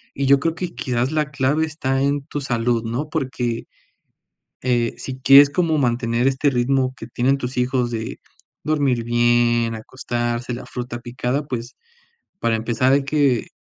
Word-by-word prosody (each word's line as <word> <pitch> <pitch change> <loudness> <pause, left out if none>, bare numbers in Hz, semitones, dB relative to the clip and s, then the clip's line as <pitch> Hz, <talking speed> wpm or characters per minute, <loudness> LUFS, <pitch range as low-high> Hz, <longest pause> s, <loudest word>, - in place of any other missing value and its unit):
y 140 - -1
yo 140 0 +6
creo 165 +3 -1
que 175 0 -5
quizás, 125 +2 -1
la 150 -1 -1
clave 140 +3 +1
está 135 -4 -2
en 140 0 0
tu 145 - -4
salud, 120 -2 0
¿no?, 125 +7 -3
porque, 130 -6 -2 1.0
eh, 120 -2 0
si 130 -1 -7
quieres 140 +2 +8
como 165 -1 +1
mantener 120 -1 +1
este 135 +2 +2
ritmo 130 +1 +1
que 115 - -8
tienen 125 +3 +1
tus 125 -1 -5
hijos 125 -1 0
de 110 -1 -5 0.4
dormir 140 -6 +1
bien, 120 -1 +2
acostarse, 120 +1 -3
la 120 - -6
fruta 120 -1 -5
picada, 125 +4 -3
pues, 120 -2 -5 0.6
para 115 - +1
empezar 120 +3 +1
hay 140 - +3
que, 140 -5 +1
130 Hz, 160 wpm, -21 LUFS, 120-140 Hz, 1.0 s, quieres